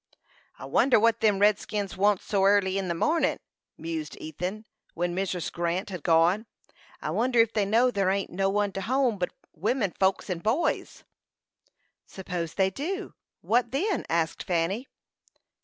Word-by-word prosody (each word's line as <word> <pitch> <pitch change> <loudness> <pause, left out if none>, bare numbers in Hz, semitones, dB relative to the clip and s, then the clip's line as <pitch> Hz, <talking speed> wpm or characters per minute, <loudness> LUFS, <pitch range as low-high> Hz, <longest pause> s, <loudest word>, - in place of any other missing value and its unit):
"I - - -9
wonder 260 -4 +4
what 230 +1 +3
them 210 -3 +3
redskins 205 -1 +1
wants 200 0 +2
here - - -17
so 195 -2 +3
airly 195 -1 +3
in 190 - -3
the 170 - -1
mornin'," 320 - +1 0.4
mused 160 -2 -5
Ethan, 180 +8 -5 0.3
when 175 0 -1
Mrs. 185 -2 -2
Grant 175 +3 -2
had 180 -4 -5
gone. 170 +8 +3 0.6
"I - - -2
wonder 245 +1 +1
ef 225 -1 +4
they 210 -2 +1
know 235 +5 +3
there 195 -4 +1
ain't 195 0 -1
no 195 +2 0
one 205 0 0
to 195 - -5
home 250 -2 +1
but 180 - 0 0.2
women 205 - 0
folks 190 +1 0
and 180 -4 -3
boys." 240 - -1 1.0
"Suppose 180 -4 -5
they 190 -1 +2
do 335 - -3
know, - - -9 0.3
what 240 +1 +1
then?" 325 - -1
asked 165 -1 0
Fanny. 185 +8 -1
195 Hz, 165 wpm, -27 LUFS, 180-225 Hz, 1.0 s, wonder